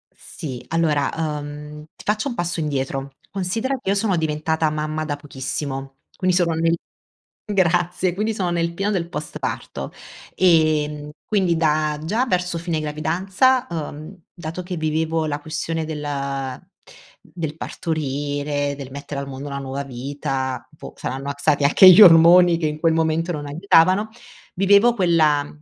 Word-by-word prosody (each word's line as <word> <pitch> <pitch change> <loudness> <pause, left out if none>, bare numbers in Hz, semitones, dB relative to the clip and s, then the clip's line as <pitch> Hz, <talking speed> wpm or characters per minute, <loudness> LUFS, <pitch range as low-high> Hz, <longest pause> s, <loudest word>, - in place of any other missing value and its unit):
Sì 135 -8 -8
allora, 155 -4 +1 0.3
emh, 150 +1 -8
ti - - -14
faccio 215 +6 0
un 240 - -5
passo 175 -1 -2
indietro, 135 -2 -3 0.2
considera 220 +8 -2
che 195 - -4
io 200 - +2
sono 200 -2 +1
diventata 160 0 0
mamma 155 +1 -3
da 145 -2 -2
pochissimo, 135 -1 -5 0.2
quindi 185 -1 +1
sono 170 -2 +2
nel 165 +1 +2 0.7
Grazie 175 -2 +1
quindi 215 +4 -1
sono 185 -4 -1
nel 170 0 -1
pieno 200 +3 -1
del 170 -4 -1
post-parto, 155 -3 -5 0.4
ehm, 155 -4 +2
quindi 185 -6 +1
da 155 -1 +1
già 220 +10 0
verso 180 -5 -1
fine 165 -2 -2
gravidanza, 185 - +1
emh, 160 +3 -6
dato 170 +1 -6
che 180 0 -5
vivevo 160 0 0
la 145 -1 -3
questione 160 +1 -3
del 140 -3 -4 0.7
del 160 -3 -5
partorire, 145 -2 -2
del 135 -2 -8
mettere 140 0 -6
al 140 - -5
mondo 135 +1 -7
una 140 0 -4
nuova 135 +1 -4
vita, 130 -1 -4
boh 150 - -11
saranno 135 +2 -5
ac 140 0 -4
stati 145 - +2
anche 165 +6 +8
gli 185 - +8
ormoni 175 -1 +8
che 160 - -1
in 150 0 -3
quel 165 -1 +3
momento 160 +1 0
non 145 -2 -5
aiutavano, 185 +6 +3 0.5
vivevo 200 +5 +5
quella 160 -7 +2
160 Hz, 150 wpm, -21 LUFS, 145-180 Hz, 0.7 s, anche